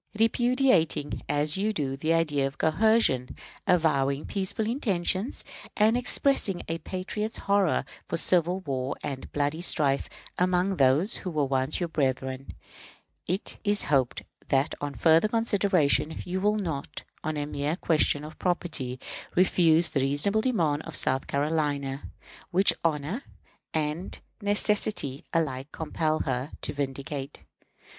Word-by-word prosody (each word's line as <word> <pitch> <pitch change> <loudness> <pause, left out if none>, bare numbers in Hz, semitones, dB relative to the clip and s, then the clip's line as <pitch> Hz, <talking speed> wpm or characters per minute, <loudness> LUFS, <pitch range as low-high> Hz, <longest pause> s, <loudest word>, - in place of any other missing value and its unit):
Repudiating, 230 - +2
as 150 +3 +1
you 210 +3 0
do, 140 -7 -2
the 155 +4 -1
idea 150 -4 +2
of 135 - -9
coercion, 160 - +2 0.3
avowing 140 -5 +2
peaceful 200 +2 -2
intentions, 205 -3 -1 0.3
and 215 +2 +4
expressing 245 -5 +1
a 165 0 -3
patriot's 210 +5 -4
horror 200 -7 +1 0.2
for - - -2
civil 180 +2 +3
war 135 -5 -3
and 135 -2 -5
bloody 145 +3 -1
strife 140 -5 +1 0.3
among 180 +1 +1
those 140 - +3
who 185 - -5
once 140 -3 0
were 175 - -1
brethren, 130 -3 -2 0.8
it 185 +4 -2
is 205 0 +3
hoped 130 -3 +1 0.2
that 135 +1 +1
on 145 -1 -4
further 165 +4 +4
consideration 200 -9 +1
you 185 +1 -3
will 210 +1 +2
not, 160 -9 -4 0.2
on 155 -1 -2
a 145 - -2
mere 145 +2 -2
question 155 -4 +1
of 155 +1 -10
property, 155 -8 -1 0.4
refuse 170 -2 +4
the 140 - -1
reasonable 145 +11 +1
demand 165 - +1
of 165 0 -8
South 130 0 +1
Carolina, 145 -2 -1 0.5
which 190 +3 +5
honor 160 - -1 0.5
and 155 +3 -2 0.2
necessity 205 -8 +2
alike 140 -4 -1
compel 155 0 -1
her 130 +1 -3
to - - -1
vindicate. 140 0 -5
160 Hz, 130 wpm, -27 LUFS, 140-190 Hz, 0.8 s, which